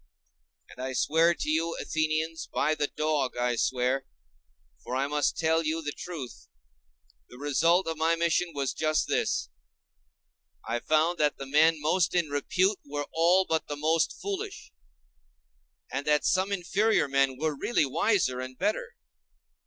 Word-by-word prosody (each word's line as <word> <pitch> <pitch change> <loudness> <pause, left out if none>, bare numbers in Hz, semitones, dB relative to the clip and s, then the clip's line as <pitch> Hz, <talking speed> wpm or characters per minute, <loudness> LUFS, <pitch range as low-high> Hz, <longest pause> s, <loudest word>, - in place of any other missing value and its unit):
And 125 - -9
I 130 0 -3
swear 165 +5 +3
to - - -5
you, 165 +2 0
Athenians, 160 +1 -1
by 155 - +1
the 150 -1 -1
dog 150 -5 -1
I 120 0 +1
swear!—for 70 - -4
I 135 +1 +1
must 145 +1 0
tell 160 0 +2
you 160 +1 -2
the 145 - -3
truth—the - - -12
result 165 +6 +2
of 160 -1 -3
my 165 +1 +3
mission 170 +1 +1
was 140 -2 -1
just 155 -1 0
this: - - 0 1.2
I 115 +1 -1
found 155 +5 +1
that 150 -1 +2
the 135 - -6
men 155 +3 +4
most 160 +4 +1
in 170 -4 +1
repute 185 +7 +1
were 145 0 -4
all 175 +3 +4
but 160 -2 -1
the 145 - -5
most 160 +2 +1
foolish; 420 +2 -5 1.2
and 140 - -2
that 150 0 +2
some 190 +2 +1
inferior 200 +1 +1
men 135 -1 +1
were 155 +1 -1
really 155 +3 +1
wiser 135 - +1
and 130 0 -7
better. 210 - -2
155 Hz, 145 wpm, -28 LUFS, 130-165 Hz, 1.2 s, men